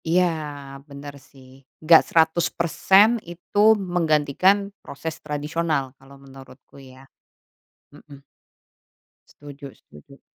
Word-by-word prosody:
Iya, 175 +3 +3 0.7
benar 140 0 -10 0.2
sih, 130 -2 -18 0.3
enggak 160 0 +6
100% 170 +4 +3 0.2
itu 175 +3 -10 0.4
menggantikan 180 +5 +1
proses 160 +3 -7
tradisional, 150 -2 -3
kalau 140 +1 -17
menurutku 135 0 -16
ya 130 +1 -17 0.9
hmm. 140 -2 -15 1.1
Setuju 145 -1 -12
setuju. 75 - -19
150 Hz, 85 wpm, -22 LUFS, 140-170 Hz, 1.1 s, enggak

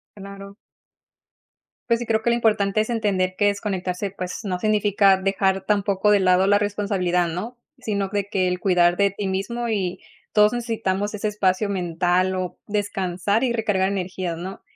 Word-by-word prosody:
Claro. 200 0 -10 1.3
Pues 235 -1 +3
sí, 240 - -4
creo 220 -1 +1
que, 235 - +1
lo 235 - +2
importante 215 -3 +2
es 220 - -1
entender 195 -5 0
que 205 - +2
desconectarse, 195 -2 -2
pues, 180 0 -5
no 185 -3 -2
significa 205 -1 +3
dejar 195 0 0
tampoco 200 -1 +1
de 205 -1 +5
lado 185 0 +4
la 205 +1 +4
responsabilidad, 195 -4 0
¿no?, 215 +9 -5 0.2
sino 200 -2 -2
de 200 0 -2
que 185 -2 +1
el 180 0 -2
cuidar 175 -2 +3
de 200 +1 +3
ti 200 +1 -5
mismo, 220 +6 -2
y 190 -4 -1 0.3
todos 210 0 +5
necesitamos, 210 -4 -2
ese 210 +1 -2
espacio 205 -1 0
mental, 180 0 0
o 185 -1 -4
descansar 200 0 -1
y 245 - +1
recargar 210 -5 0
energías, 185 -3 -3
¿no?, 185 +3 -7
200 Hz, 165 wpm, -23 LUFS, 185-210 Hz, 1.3 s, de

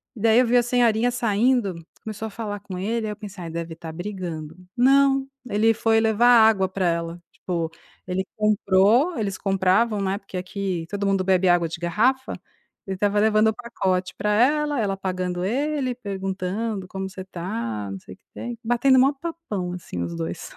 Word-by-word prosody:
Daí 225 +1 +4
eu 255 - +4
vi 245 +2 +4
a 240 - +4
senhorinha 240 -1 +2
saindo, 235 -3 +1 0.3
começou 220 0 -5
a - - -9
falar 205 -1 -5
com 190 -2 -7
ele. 220 +4 -1
Aí - - -3
eu - - -5
pensei: 200 -5 -8
"Deve 165 0 -5
estar 165 -1 -8
brigando." 170 -4 -6 0.2
Não, 270 +1 +4 0.2
ele 220 +2 +3
foi 225 +1 +3
levar 220 +1 +3 0.2
água 195 -4 +1
pra 185 -1 -1
ela. 170 0 -2
Tipo, 170 -3 -3 0.4
ele 185 +1 -1
comprou, 215 - +3
eles 200 -3 -2
compravam, 195 +3 +2
né, 195 0 0
porque 195 -2 -8
aqui 185 -2 -3
todo 200 0 -2
mundo 195 -1 +1
bebe 185 -1 +3
água 175 -1 +3
de 165 +2 -7
garrafa, 235 +10 +1 0.5
ele 195 - -2
estava 205 +2 +1
levando 215 0 +4
o 220 - -2
pacote 185 -6 -2
pra 210 - -1
ela, 290 +6 +2
ela 200 -3 0
pagando 185 -2 -3
pra 185 - 0
ele, 275 0 -1
perguntando: 195 -1 -3
"Como 190 +1 -5
você 190 0 -8
está?", 115 - -4
não 95 - -6
sei 95 - -12
o - - -33
que - - -46
tem, 240 -1 -6
batendo 240 +3 +3
o - - +7
maior 275 +2 +3
papão, 315 - -4
assim, 170 - -6
os 85 0 -5
dois. 85 +1 -5
200 Hz, 190 wpm, -24 LUFS, 180-230 Hz, 0.5 s, o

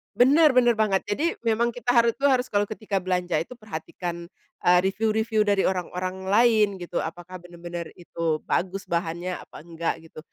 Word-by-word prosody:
Bener, 295 +5 +6
bener 245 -2 +4
banget. 205 -3 +1
Jadi, 305 +12 -1
memang 235 +1 +1
kita 245 +1 -12
hari 235 0 +5
itu 280 +4 0
harus, 255 -1 +1
kalau 205 0 +1
ketika 210 -2 -3
belanja 180 -3 -1
itu 210 +10 -6
perhatikan, 170 -4 -6 0.3
eee, 180 0 +5
review-review 220 +2 +1
dari 200 -1 +3
orang-orang 185 0 -3
lain 215 0 +4
gitu, 175 -2 -4
apakah 175 +2 -6
bener-bener 175 -1 -8
itu 165 -3 -3
bagus 190 +2 -1
bahannya, 170 +1 -3
apa - - -12
enggak 165 -1 -4
gitu. 160 -1 -12
190 Hz, 165 wpm, -25 LUFS, 175-225 Hz, 0.3 s, Bener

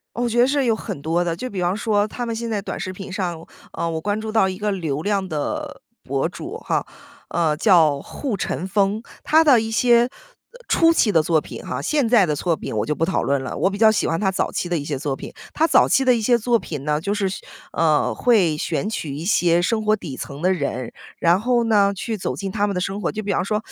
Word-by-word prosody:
我 240 0 -1
觉 240 - 0
得 245 - +6
是 280 -1 +1
有 230 -2 +2
很 145 - -6
多 165 +4 0
的。 170 -1 -2
就 255 +7 -5
比 190 -3 -4
方 175 +2 +1
说 210 -1 +1
他 245 +3 -5
们 230 -1 -3
现 230 0 -4
在 210 -2 -1
短 - - -5
视 185 - -4
频 190 0 -8
上， 175 -4 -3 0.3
呃， 170 - -2
我 160 -1 -2
关 205 +4 -1
注 220 0 -5
到 215 -4 +3
一 185 -1 -4
个 210 0 -1
流 155 -7 -2
量 195 +1 -1
的 150 -4 -4 0.2
博 - - -1
主 - - -7
哈， - - -2 0.4
呃， 160 -3 0
叫 160 -8 +4
户 245 - -4
晨 175 +2 -3
风。 200 +2 +1 0.2
他 320 +1 +5
的 270 -7 +6
一 225 0 -3
些 240 +1 +4 0.6
初 330 0 +4
期 215 -9 +3
的 160 -3 +3
作 160 -1 +2
品 - - -9
哈， 125 +2 -4
现 285 - +1
在 220 -6 +4
的 150 - 0
作 165 +2 0
品 - - -6
我 105 - 0
就 150 - 0
不 160 - -2
讨 190 - 0
论 135 +2 0
了， - - -5
我 190 - +2
比 200 - -6
较 220 -1 +6
喜 215 - 0
欢 165 0 0
他 190 -2 +1
早 - - -1
期 175 - -3
的 175 - 0
一 145 - -5
些 145 -4 -3
作 140 -2 -2
品。 - - -9 0.2
他 315 - +2
早 - - +4
期 270 - +3
的 255 - +5
一 230 - 0
些 240 +2 +3
作 235 0 +1
品 145 -4 -6
呢， 150 0 0
就 200 +4 -1
是 205 -2 0 0.4
呃， 155 -2 +2
会 195 -11 +3
选 160 +6 -2
取 155 -10 -4
一 155 +3 -6
些 175 -3 +3
生 220 +3 0
活 215 0 +3
底 160 -10 -7
层 140 +4 -7
的 185 - +3
人， 130 -7 -3 0.2
然 175 +4 +3
后 240 0 +2
呢 205 -3 +3
去 220 +3 -4
走 - - -3
进 195 -1 -4
他 205 0 0
们 200 - -2
的 180 - 0
生 195 +3 -3
活。 - - -1
就 215 0 -5
比 200 - -2
方 - - 0
说 210 +2 -2
195 Hz, 280 characters per minute, -22 LUFS, 165-220 Hz, 0.6 s, 得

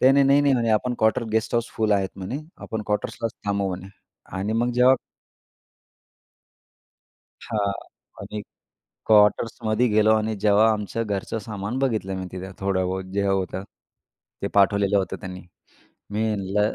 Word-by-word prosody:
ते, 130 - +7
"नाही, 140 0 +5
नाही, 140 +1 +5
नाही. 140 -2 +4
म्हणे, 115 -2 +1
आपण 120 +3 +1
क्वार्टर 110 +2 +2
गेस्ट 110 +1 0
हाऊस 115 0 +1
फुल 110 -1 +2
आहेत 95 -1 +2
म्हणे. 95 +9 -4 0.2
आपण 110 -1 -4
क्वार्टर्सलाच 105 +2 -2
थांबू 100 -1 0
म्हणे." 95 +1 -5 0.5
आणि 105 +3 -1
मग 120 +2 +1
जेव्हा 125 +2 +6 2.5
हां, 100 -3 0 0.5
आणि 105 0 -6 0.7
क्वार्टर्समध्ये 110 +2 +3
गेलो 110 +1 +4
आणि 110 0 -1
जेव्हा 105 +1 +5
आमचं 105 +2 -2
घरचं 100 +2 -2
सामान 105 +3 -4
बघितलं 110 -8 0
मी 95 0 -4
तिथं 95 +1 -6
थोडाबहुत 95 -1 -1
जे 100 - +1
होतं, 95 -1 -1 0.8
ते - - 0
पाठवलेलं 100 0 +4
होतं 95 - -2
त्यांनी. 95 -2 -7 0.7
मी 110 +2 0
म्हणलं, 105 +1 0
105 Hz, 145 wpm, -24 LUFS, 100-115 Hz, 2.5 s, ते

